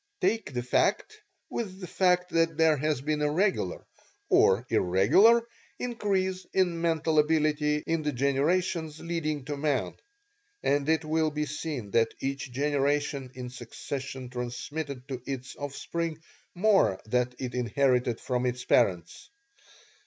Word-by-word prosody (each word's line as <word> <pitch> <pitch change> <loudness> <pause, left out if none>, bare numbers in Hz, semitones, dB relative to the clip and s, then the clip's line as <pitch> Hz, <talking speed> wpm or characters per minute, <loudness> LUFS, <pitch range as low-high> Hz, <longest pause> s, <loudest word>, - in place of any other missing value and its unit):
Take 200 +1 0
that 120 -1 -2
fact 420 - +1 0.3
with 195 -5 -5
the 185 - -6
fact 180 0 +1
that 165 -1 +1
there 160 -1 +5
has 150 -1 -1
been 150 +1 -1
a 150 - +2
regular 180 - 0 0.4
(or 100 +6 +4
irregular) 130 - +4 0.3
increase 195 -6 -1
in 175 -3 +1
mental 160 -2 +2
ability 150 -1 +2
in 165 -1 0
the 150 -1 -1
generations 150 +4 0
leading 155 -4 -3
to 145 0 -3
man, 145 -2 0 0.7
and 145 +1 +1
it 160 0 +2
will 155 0 +1
be 150 0 -2
seen 145 -7 -5
that 115 +1 +2
each 135 -1 -3
generation 140 0 0
in 125 -1 -6
succession 130 0 -6
transmitted 125 +2 -5
to 130 -3 -5
its 130 -2 -5
offspring 155 +3 -4 0.4
more 195 - +3
than 125 +2 0
it 125 -2 -5
inherited 125 0 +1
from 125 -1 -1
its 125 0 -3
parents. 90 -7 +1
150 Hz, 135 wpm, -28 LUFS, 125-165 Hz, 0.7 s, there